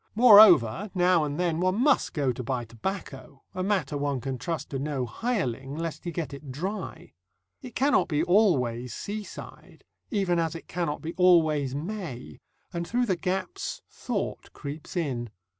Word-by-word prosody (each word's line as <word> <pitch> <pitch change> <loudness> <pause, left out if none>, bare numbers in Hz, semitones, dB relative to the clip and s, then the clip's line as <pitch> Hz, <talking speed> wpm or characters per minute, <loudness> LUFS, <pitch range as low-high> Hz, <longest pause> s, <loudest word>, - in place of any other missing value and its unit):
Moreover, 205 - +7
now 180 -2 +4
and 145 +1 -3
then, 170 -2 0
one 185 +3 +1
must 285 +2 +3
go 140 -5 +1
to 125 - -6
buy 120 0 -2
tobacco, 135 - -6
a 185 - -3
matter 185 -7 0
one 140 -2 -1
can 130 0 -4
trust 165 +6 -4
to 135 - -2
no 140 -2 -2
hireling, 140 - -3
lest 165 +1 -5
he 175 - -2
get 165 -3 -4
it 140 -1 -8
dry. 185 +10 -5 0.5
It 250 -4 -10
cannot 280 +3 +3
be 150 -2 0
always 130 - +2
seaside, 210 0 -8 0.3
even 195 -7 +1
as 165 0 -1
it 165 - -9
cannot 165 -4 -3
be 165 +2 -4
always 155 -7 +4
May, 150 - -6 0.3
and 170 0 -3
through 245 +1 +1
the 190 -5 +1
gaps 185 +1 -3
thought - - -4
creeps 150 +5 -7
in. 125 -8 -2
165 Hz, 160 wpm, -27 LUFS, 135-190 Hz, 0.5 s, Moreover